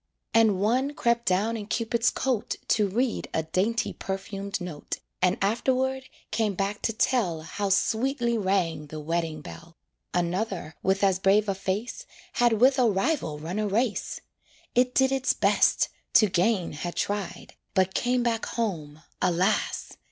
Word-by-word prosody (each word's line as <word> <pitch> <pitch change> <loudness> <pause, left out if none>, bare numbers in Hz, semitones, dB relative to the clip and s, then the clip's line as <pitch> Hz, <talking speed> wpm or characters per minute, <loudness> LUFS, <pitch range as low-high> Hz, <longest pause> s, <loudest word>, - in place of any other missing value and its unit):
And 220 -4 +4
one 255 +8 +1
crept 235 0 +1
down 205 +5 +2
in 210 -2 -5
Cupid's 230 +1 +1
coat 255 -5 -1
To 210 -2 +3
read 235 +5 -1
a 160 - +1
dainty 195 +8 0
perfumed 195 +1 -4
note, 175 -5 -5 0.2
And 180 0 +3
afterward 260 +5 0 0.3
came 215 -2 0
back 200 +2 -2
to - - 0
tell 215 -9 +1
How 195 +5 -3
sweetly 235 +4 +1
rang 185 -7 0
the 155 +1 -7
wedding 160 0 -2
bell. 165 +3 -11 0.3
Another, 175 -1 -2
with 190 +1 +1
as 190 -2 +3
brave 200 +2 +3
a 200 - +1
face, 205 - -3 0.3
Had 240 -1 +3
with 255 +5 +4
a 245 -2 +5
rival 195 - 0
run 165 +7 -4
a 215 - 0
race; 220 +3 -1 0.5
It 250 +1 +2
did 265 0 +4
its 270 -1 +2
best, - - +3 0.2
to 215 - +7
gain 185 0 +1
had 170 +4 -5
tried, 205 -2 -3 0.2
But 190 0 +2
came 250 0 +1
back 230 -2 0
home, 160 -9 -3 0.2
alas! 180 +2 0
205 Hz, 150 wpm, -27 LUFS, 180-235 Hz, 0.5 s, to